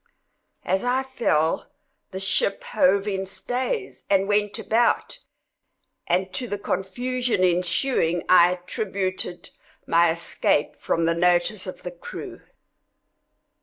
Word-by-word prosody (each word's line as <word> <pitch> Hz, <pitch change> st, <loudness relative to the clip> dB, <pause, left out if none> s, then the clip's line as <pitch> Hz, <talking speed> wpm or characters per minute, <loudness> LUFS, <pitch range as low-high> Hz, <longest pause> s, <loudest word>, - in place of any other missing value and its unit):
As 190 Hz, +2 st, +1 dB
I 250 Hz, +2 st, +1 dB
fell, 165 Hz, -12 st, 0 dB, 0.4 s
the 190 Hz, -, -6 dB
ship 340 Hz, -, 0 dB
hove 275 Hz, -, +2 dB
in 195 Hz, -2 st, -1 dB
stays, 260 Hz, -, -3 dB
and 195 Hz, 0 st, +3 dB
went 205 Hz, 0 st, +1 dB
about; 235 Hz, -, +1 dB, 0.9 s
and 185 Hz, +2 st, 0 dB
to 250 Hz, -, -3 dB
the 205 Hz, -, -3 dB
confusion 235 Hz, +4 st, -1 dB
ensuing 175 Hz, 0 st, +1 dB
I 175 Hz, -1 st, +7 dB
attributed 185 Hz, -1 st, -3 dB, 0.3 s
my 170 Hz, 0 st, +4 dB
escape 165 Hz, -3 st, 0 dB
from 165 Hz, -, -1 dB
the 165 Hz, -, +2 dB
notice 180 Hz, +3 st, +1 dB
of 185 Hz, -, -8 dB
the -, -, -5 dB
crew. -, -, -9 dB
195 Hz, 115 wpm, -24 LUFS, 175-245 Hz, 0.9 s, I